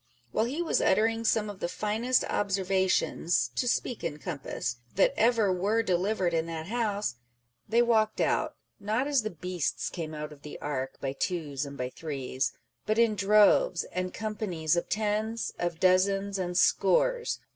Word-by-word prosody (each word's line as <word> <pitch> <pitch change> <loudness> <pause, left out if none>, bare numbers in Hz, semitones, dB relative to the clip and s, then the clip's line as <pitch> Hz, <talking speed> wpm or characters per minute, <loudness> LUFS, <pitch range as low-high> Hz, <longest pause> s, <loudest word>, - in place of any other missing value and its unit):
While 220 - +1
he 290 +8 -2
was 335 - +1
uttering 225 +3 +2
some 220 -1 +2
of 205 -2 -7
the - - -1
finest 220 +7 0
observations 190 -8 +1
(to 245 - 0
speak 240 -2 -1
in 160 -3 -3
compass) 140 -7 -4 0.2
that 195 - +4
ever 225 -4 +3
were 205 +5 +1
delivered 185 -1 0
in 165 0 0
that 160 -1 -5
House, 210 - -1 0.5
they 235 +3 +4
walked 220 -2 +2
out, - - +1 0.2
not 215 +5 0
as 285 -3 +2
the 215 - -3
beasts 180 -2 -3
came 160 -3 -5
out 150 0 -6
of 145 - -17
the 150 - -9
ark, 135 -3 -3
by 135 -1 -3
twos 145 -4 -2
and 140 0 -9
by 125 0 -3
threes, 135 -4 -3 0.4
but 215 +1 +1
in 230 -2 +4
droves 210 - +4
and 185 0 -2
companies 200 -7 -1
of 170 - -2
tens, 215 +2 -1
of 175 -2 -2
dozens, 195 +2 +2
and 180 -1 -2
scores - - +2
195 Hz, 165 wpm, -29 LUFS, 165-220 Hz, 0.5 s, that